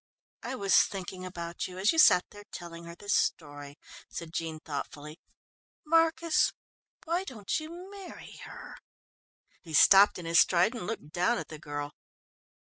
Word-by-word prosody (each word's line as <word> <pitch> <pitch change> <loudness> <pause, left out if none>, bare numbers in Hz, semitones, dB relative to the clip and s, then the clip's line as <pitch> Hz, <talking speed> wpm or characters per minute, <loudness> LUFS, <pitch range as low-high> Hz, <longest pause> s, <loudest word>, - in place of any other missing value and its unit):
"I 265 - -5
was 200 -6 +2
thinking 185 -1 -7
about 170 -2 -5
you, 185 0 -10
as 195 +3 +3
you 325 - 0
sat 180 - +7
there 205 0 -13
telling 170 -1 -9
her 170 0 -9
the 205 - -15
story," 145 -7 -1 0.3
said 165 -1 -8
Jean 165 -1 -4
thoughtfully. 150 +1 -7 0.7
"Marcus, 330 +1 +2 0.5
why 340 +3 0
don't 225 - -3
you 310 0 -8 0.2
marry 395 -2 -11
her?" - - -11 0.8
He 160 -3 -6
stopped 195 +6 +7
in 175 - -8
his 165 0 +4
stride 180 +6 +4
and 225 -7 -6
looked 210 -9 -6
down 180 +8 +1
at - - -6
the 155 - -9
girl. 145 -1 -6
180 Hz, 155 wpm, -29 LUFS, 160-225 Hz, 0.8 s, sat